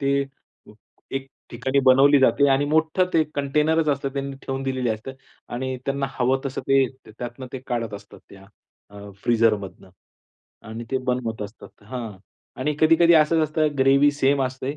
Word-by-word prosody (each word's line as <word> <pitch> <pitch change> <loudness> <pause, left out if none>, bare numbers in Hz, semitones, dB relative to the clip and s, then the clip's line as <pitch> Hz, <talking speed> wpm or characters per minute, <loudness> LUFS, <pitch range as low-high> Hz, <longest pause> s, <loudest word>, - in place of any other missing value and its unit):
ते 140 0 +1 1.0
एक 135 - -5 0.2
ठिकाणी 135 +1 -1
बनवली 135 +2 +6
जाते 140 +1 +4
आणि 135 +1 +3
मोठं 160 +4 +2
ते 160 - +5
कंटेनरच 150 +3 +1
असतं 140 -1 0
त्यांनी 140 0 -4
ठेवून 135 0 -4
दिलेली 130 -2 -2
असते 110 +4 -5 0.4
आणि 130 +1 -3
त्यांना 140 0 -1
हवं 130 +1 0
तसं 135 - -4
ते 135 -1 +4 0.2
त्यातनं 120 +3 -8
ते 130 - -4
काढत 115 -3 -3
असतात 100 0 -12
त्या 95 0 -15 0.8
फ्रिझरमधनं, 110 -5 0 0.8
आणि 115 +2 -6
ते 130 - +1
बनवत 120 -4 -2
असतात. 105 +2 -10 0.2
हां 120 -4 -6 0.5
आणि 150 +3 0
कधी-कधी 165 +2 +5
असंच 155 +1 +4
असतं. 155 0 +1
ग्रेव्ही 135 +2 +5
सेम 140 -1 +1
असते, 130 +2 -4
135 Hz, 150 wpm, -23 LUFS, 125-145 Hz, 1.0 s, बनवली